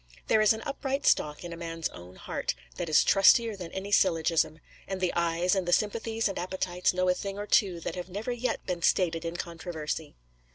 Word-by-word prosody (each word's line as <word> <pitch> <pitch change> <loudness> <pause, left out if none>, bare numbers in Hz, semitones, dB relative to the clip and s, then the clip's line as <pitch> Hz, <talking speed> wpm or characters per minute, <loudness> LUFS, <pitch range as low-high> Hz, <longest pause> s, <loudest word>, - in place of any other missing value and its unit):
There 220 - +5
is 215 - +5
an 220 0 -1
upright 275 0 -3
stock 150 +2 +2
in 170 -1 -6
a - - -6
man's 165 -1 -4
own 90 +1 -12
heart, - - -3 0.2
that 175 -2 -3
is 155 - +5
trustier 220 +3 +5
than 180 -4 -8
any 195 +2 -5
syllogism; 165 -4 +2 0.3
and 190 -1 -3
the 185 -1 0
eyes, 170 +1 +1
and 190 -3 0
the - - 0
sympathies 225 +2 +1
and 195 - -4
appetites, 180 0 -1
know 185 0 0
a 180 - +4
thing 195 +2 -5
or 205 - -4
two 190 -4 +2
that - - -4
have 180 0 -6
never 210 +6 -4
yet 245 +1 -2
been 180 -2 -3
stated 165 -2 +2
in 165 +1 -3
controversy. 160 -3 -5
180 Hz, 210 wpm, -28 LUFS, 170-205 Hz, 0.3 s, There